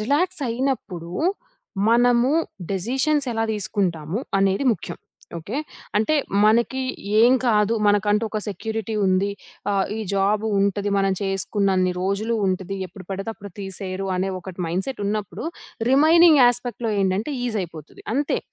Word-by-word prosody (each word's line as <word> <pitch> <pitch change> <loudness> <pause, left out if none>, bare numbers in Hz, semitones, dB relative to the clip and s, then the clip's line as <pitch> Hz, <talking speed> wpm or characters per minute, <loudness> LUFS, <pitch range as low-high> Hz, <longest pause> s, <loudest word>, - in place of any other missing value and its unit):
రిలాక్సయినప్పుడు 260 - -1 0.8
మనము 245 +2 +4 0.4
డెసిషన్స్ 265 - 0
ఎలా 225 0 0
తీసుకుంటాము 185 -3 -2 0.2
అనేది 195 +6 +2
ముఖ్యం. - - -8 0.4
ఓకే. 200 - -6 0.4
అంటే 220 +9 +2 0.3
మనకి 235 +4 +3 0.4
ఏం 240 +2 +7
కాదు. 220 -1 +3
మనకంటూ 205 +2 +3
ఒక 215 - -2
సెక్యూరిటీ 220 +2 -4
ఉంది. 185 +2 +2 0.4
ఆహ్, 195 -1 +1
ఈ - - -4
జాబు 205 +2 +1
ఉంటది. 200 +1 0
మనం 195 0 +2
చేసుకున్నన్ని 195 -1 +1
రోజులు 200 +5 0
ఉంటది. 190 +1 -2
ఎప్పుడు 185 +1 -12
పడితే 195 +3 -3
అప్పుడు 200 -1 -10
తీసేయరు 195 0 -5
అనే 190 +1 0
ఒకటి 185 0 -10
మైండ్‌సెటున్నప్పుడు 200 +2 -3 0.5
రిమైనింగ్ 315 +2 +6
యాస్పెక్ట్‌లో 245 -1 +1
ఏంటంటే 195 +8 0
ఈజయిపోతది 175 - -5
అంతే. 285 +2 +1
205 Hz, 115 wpm, -23 LUFS, 195-240 Hz, 0.8 s, ఏం